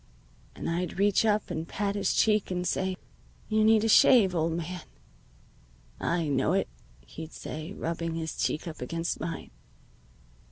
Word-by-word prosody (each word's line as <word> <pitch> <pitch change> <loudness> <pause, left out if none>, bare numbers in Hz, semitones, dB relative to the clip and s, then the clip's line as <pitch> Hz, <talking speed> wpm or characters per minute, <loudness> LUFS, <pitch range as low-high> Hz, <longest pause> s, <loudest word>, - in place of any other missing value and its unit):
And - - -5
I'd 170 +1 -2
reach 205 +2 +3
up 215 -1 +1
and 160 +1 -3
pat 200 +1 -2
his 205 - 0
cheek 215 -2 +3
and 180 -1 -2
say, 185 0 -1 0.5
'You 215 0 +3
need 220 0 +5
a - - +2
shave, 215 -3 +6
old 165 -1 0
man.' 170 +2 -4 1.2
"'I 170 -2 0
know 135 +4 +2
it,' 195 - +1 0.4
he'd 160 0 -9
say, 155 +5 -6
rubbing 165 -2 -3
his 160 -1 -4
cheek 155 - -1
up 160 -4 -7
against 165 +6 -3
mine. 165 +1 -5
175 Hz, 155 wpm, -28 LUFS, 165-205 Hz, 1.2 s, shave